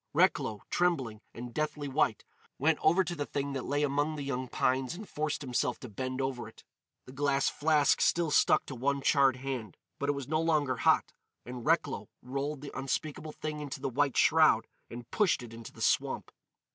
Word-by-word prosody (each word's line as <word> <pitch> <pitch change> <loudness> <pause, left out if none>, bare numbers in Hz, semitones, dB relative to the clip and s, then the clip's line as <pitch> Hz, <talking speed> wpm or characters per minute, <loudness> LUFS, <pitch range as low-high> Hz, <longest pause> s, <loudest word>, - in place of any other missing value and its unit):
Recklow, 105 -2 +2
trembling 135 -12 0
and 120 0 -8
deathly 150 0 -2
white, 135 - +1 0.3
went 155 +2 +2
over 175 +4 +4
to 180 - -4
the 145 -2 -3
thing 140 0 -3
that 135 -2 -3
lay 145 +1 0
among 145 +2 0
the 145 - -4
young 130 -2 -3
pines 130 +5 0
and 210 +3 -8
forced 150 0 -2
himself 125 -3 -1
to 125 - -6
bend 130 +5 -4
over 130 -4 -2
it. 110 - -15 0.4
The - - -11
glass 140 0 +1
flask 150 -1 +3
still 170 -3 +2
stuck - - +4
to - - -7
one 135 +2 -1
charred 140 -3 +4
hand, 130 -7 -5 0.2
but 140 - -1
it - - +3
was 140 -2 -5
no 155 +2 +1
longer 150 -6 +1
hot. - - +3 0.3
And 125 0 -7
Recklow 155 -10 +1
rolled 140 +3 -3
the 145 - -8
unspeakable 150 +3 -3
thing 155 -1 -5
into 145 -2 -5
the 135 0 -2
white 140 +1 +1
shroud - - +5 0.2
and 120 0 -8
pushed 195 -11 +2
it 115 -1 -10
into 115 0 -9
the - - -13
swamp. - - +1
140 Hz, 195 wpm, -31 LUFS, 130-150 Hz, 0.4 s, shroud